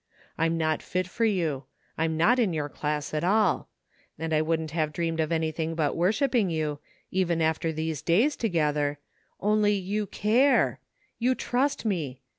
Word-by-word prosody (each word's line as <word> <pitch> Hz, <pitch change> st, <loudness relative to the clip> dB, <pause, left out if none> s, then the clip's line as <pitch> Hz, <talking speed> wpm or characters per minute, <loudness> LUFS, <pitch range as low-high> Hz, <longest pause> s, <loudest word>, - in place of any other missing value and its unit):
I'm 165 Hz, +1 st, +1 dB
not 155 Hz, -1 st, 0 dB
fit 185 Hz, 0 st, -2 dB
for 230 Hz, +5 st, -1 dB
you 165 Hz, -10 st, 0 dB, 0.2 s
— -, -, -18 dB
^I'm 160 Hz, 0 st, +1 dB
not 195 Hz, +11 st, +3 dB
in 210 Hz, -8 st, +2 dB
your 150 Hz, -2 st, -2 dB
dass 150 Hz, 0 st, -3 dB
at 155 Hz, -, -1 dB
all 200 Hz, 0 st, +2 dB, 0.2 s
— -, -, -36 dB
and 160 Hz, +1 st, -3 dB
I 155 Hz, -, +3 dB
wouldn't 160 Hz, -1 st, -1 dB
have 155 Hz, -2 st, 0 dB
dreamed 165 Hz, +1 st, -2 dB
of 160 Hz, 0 st, 0 dB
anything 160 Hz, 0 st, -1 dB
but 155 Hz, -3 st, 0 dB
worshipping 215 Hz, -, +2 dB
you, 155 Hz, -3 st, -2 dB, 0.3 s
even 175 Hz, -3 st, +1 dB
after 160 Hz, 0 st, +1 dB
these 160 Hz, -1 st, -3 dB
days 225 Hz, -, +3 dB
together— 150 Hz, -8 st, 0 dB, 0.4 s
only 210 Hz, 0 st, +3 dB
you 205 Hz, +2 st, -2 dB
care! 240 Hz, +9 st, +2 dB, 0.4 s
You 255 Hz, +2 st, +2 dB
trust 260 Hz, +1 st, -1 dB
me! 155 Hz, -, -2 dB
165 Hz, 170 wpm, -27 LUFS, 155-205 Hz, 0.4 s, not